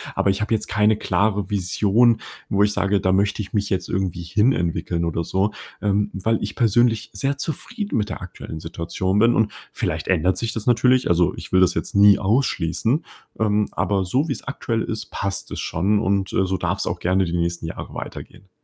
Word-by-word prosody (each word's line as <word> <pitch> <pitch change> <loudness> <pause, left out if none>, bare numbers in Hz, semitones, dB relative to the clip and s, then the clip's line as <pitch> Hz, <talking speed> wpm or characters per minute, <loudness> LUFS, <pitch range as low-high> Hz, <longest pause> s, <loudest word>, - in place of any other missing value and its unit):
aber 100 - +2
ich 95 - -3
habe 110 +2 0
jetzt 110 - 0
keine 105 +1 +2
klare 100 -2 0
Vision, 105 +4 +3 0.3
wo 100 +1 +3
ich 105 0 +2
sage, 100 0 +1
da 95 0 +1
möchte 100 +2 +1
ich 100 - -8
mich 100 -1 0
jetzt 95 -2 -1
irgendwie 90 -2 -2
hin 105 +9 +2
entwickeln 85 -3 -1
oder 85 0 -1
so, 95 +5 0 0.3
ähm, 105 0 +1
weil 110 +4 0
ich 105 - -4
persönlich 115 0 +2
sehr 135 +8 -1
zufrieden 205 - -3
mit 105 0 -1
der - - -6
aktuellen 80 -3 -8
Situation 85 +4 -2
bin. 115 +2 +5
Und 110 -2 +1 0.2
vielleicht - - -3
ändert 90 +1 +2
sich 115 -1 -2
das 115 - -5
natürlich. 125 +1 +3
Also, 85 -1 +3
ich - - -9
will 95 - +5
das 90 - +4
jetzt - - -4
nie 100 0 +7
ausschließen, 115 - +1 0.3
ähm, 105 -1 +2
aber 100 -2 0
so 130 - 0
wie's 135 - -3
aktuell 115 -4 -2
ist, 110 -1 -4
passt 100 0 -3
es - - -5
schon 100 +6 +1
und, 100 -2 0
äh, 95 - +2
so 95 0 -1
darf's 90 +2 -1
auch 85 - -2
gerne 95 +2 +2
die 85 - -4
nächsten 85 0 -2
Jahre 80 - -7
weitergehen. 95 - -9
100 Hz, 205 wpm, -22 LUFS, 95-110 Hz, 0.3 s, nie